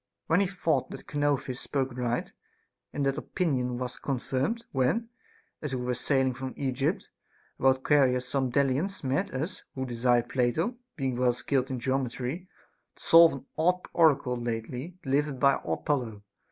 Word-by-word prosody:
We 165 +3 +4
then 200 - +3
thought 180 -3 0
that - - -9
Chonouphis 140 -3 -1
spoke 135 -3 -2
right; 120 -1 -2 0.6
and 145 - -1
that 135 +2 +1
opinion 130 -9 -1
was 125 -1 -5
confirmed 135 - -2
when, 135 - +1 0.5
as 145 -4 -3
we 125 - -3
were 125 - 0
sailing 130 +1 +1
from 130 +1 -6
Egypt, 130 -3 -1 0.5
about 130 0 +3
Caria 135 -4 +4
some 130 0 -2
Delians 140 +9 0
met 140 +9 0
us, 155 +9 -4
who 130 -1 -2
desired 120 -1 +2
Plato, 140 - +1 0.2
being 130 -4 -2
well 125 -1 +3
skilled 130 +1 -1
in 130 -2 -3
geometry, 130 +6 -2 0.5
to - - -17
solve 165 0 +8
an 135 -1 -8
odd 180 +3 +3
oracle 140 -6 +3
lately 120 +8 -4
delivered 140 0 0
by 140 +1 +4
Apollo. 110 - -2
135 Hz, 155 wpm, -28 LUFS, 125-150 Hz, 0.6 s, solve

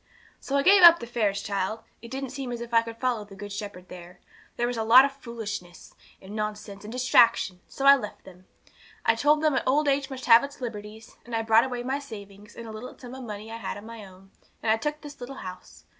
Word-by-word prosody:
'So 275 - -2
I 280 - +2
gave 390 +4 +6
up 340 -1 +10
the 235 - -7
fairs, 215 -4 -1
child; 200 +2 -3 0.2
it 235 - -10
didn't 265 0 -5
seem 265 -2 -5
as 240 - -4
if 235 0 -8
I 230 - +6
could 230 0 -9
follow 245 -3 -1
the 200 -1 -14
Good 205 +1 -8
Shepherd 200 -3 -7
there. 180 0 -12 0.4
There 240 - +1
was 245 0 -2
a - - -1
lot 245 +4 +8
of 280 - -2
foolishness, 215 -9 -8 0.3
and 195 +2 -10
nonsense, 210 -1 -5
and 210 - -8
distraction; 235 -6 +3
so 275 - -5
I 275 0 +9
left 210 -7 -7
them. 185 0 -16 0.6
I - - +5
told 295 +6 +2
them 300 -4 +3
old 290 +3 +2
age 275 0 +1
must 260 -1 -7
have 230 +1 +7
its 280 0 -8
liberties; 220 -1 -8
and 235 -1 -6
I 225 - 0
brought 225 +1 +5
away 245 -2 -4
my 265 +3 -2
savings, 205 -5 -11
and 235 - -9
a 225 - -8
little 220 +4 -9
sum 250 -1 -10
of 260 0 -8
money 215 -1 -7
I 225 - -5
had 215 -3 -5
of 205 - -10
my 225 -1 -10
own, 190 0 -16 0.3
and 220 - +2
I 220 - +3
took 295 +6 -4
this 290 -3 -11
little 260 +3 -7
house. 185 -6 -10
230 Hz, 245 wpm, -26 LUFS, 210-260 Hz, 0.6 s, up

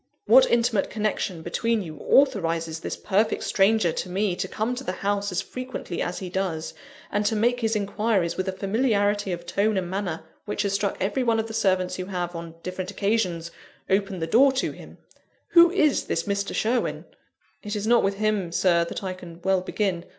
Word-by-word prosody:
What - - +7
intimate 230 -4 +2
connection 210 -5 -2
between 225 +5 0
you 155 -3 -8
authorises 165 - +2
this - - -5
perfect 210 +2 +1
stranger 195 -2 +3
to 180 - -4
me 190 0 0
to 190 - -2
come 220 +5 -2
to 255 +2 -5
the 185 - -3
house 200 0 0
as 180 +2 -1
frequently 255 -8 -5
as 175 - -2
he 185 - -5
does, 175 -4 -3 0.4
and 205 +1 +1
to 220 - +1
make 240 +3 +2
his 225 -1 0
inquiries 200 -3 0
with 185 - -2
a - - +1
familiarity 205 0 +1
of 175 -1 -5
tone 200 +4 +1
and 180 -1 -2
manner 185 -5 -3 0.2
which 210 0 -2
has 200 -1 -1
struck 200 0 0
every 200 +7 0
one 230 -2 +2
of 220 - -1
the 225 - -8
servants 190 -4 +1
who 185 - -4
have, 180 -2 -4
on 165 -1 -7
different 185 0 -4
occasions, 195 -5 -1 0.4
opened 195 -3 0
the - - +1
door 255 +11 +5
to 265 - -1
him? - - -13 0.5
Who 340 0 +7
is 305 -6 +2
this 165 - -1
Mr. 200 0 -2
Sherwin?" 235 +3 0 0.6
"It 210 0 -4
is 210 0 -2
not 235 +1 +5
with 195 0 0
him, 210 -4 0
Sir, 170 -1 +3
that 170 - -6
I 185 -1 -2
can 175 -2 -11
well 190 -1 +2
begin. 185 -2 -2
200 Hz, 200 wpm, -25 LUFS, 180-220 Hz, 0.6 s, What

